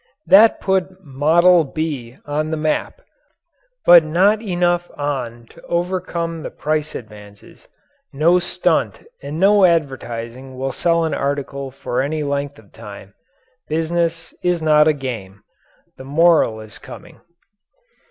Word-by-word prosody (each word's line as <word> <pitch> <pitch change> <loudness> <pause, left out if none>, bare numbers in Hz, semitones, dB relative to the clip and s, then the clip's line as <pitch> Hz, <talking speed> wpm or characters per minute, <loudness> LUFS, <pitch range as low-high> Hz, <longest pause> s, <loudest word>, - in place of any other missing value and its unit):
That 215 +4 +6
put 190 0 -2
"Model 165 +5 +4
B" 140 -5 -5
on 150 +1 -2
the 160 - -2
map 155 - -2 0.8
but 175 -2 +8
not 190 +7 +2
enough 175 -3 0
on 125 -5 -4
to 170 - -17
overcome 170 -2 -3
the - - -6
price 155 0 -3
advances. 105 -2 -13 0.4
No 165 +6 +3
stunt 175 - -1 0.2
and 155 +3 -6
no 200 +1 +4
advertising 130 -6 -1
will 135 +1 -3
sell 165 +5 +1
an 160 - -2
article 140 -1 -3
for 130 -1 -3
any 150 +3 -2
length 140 0 -3
of 105 -3 -19
time. 100 -3 -12 0.5
Business 165 +1 -2
is 180 -1 +1
not 155 -1 +4
a 155 - +4
game. 110 -9 -7 0.5
The - - -10
moral 145 -6 +2
is 110 -1 -13
coming. - - -13
155 Hz, 130 wpm, -19 LUFS, 130-170 Hz, 0.8 s, but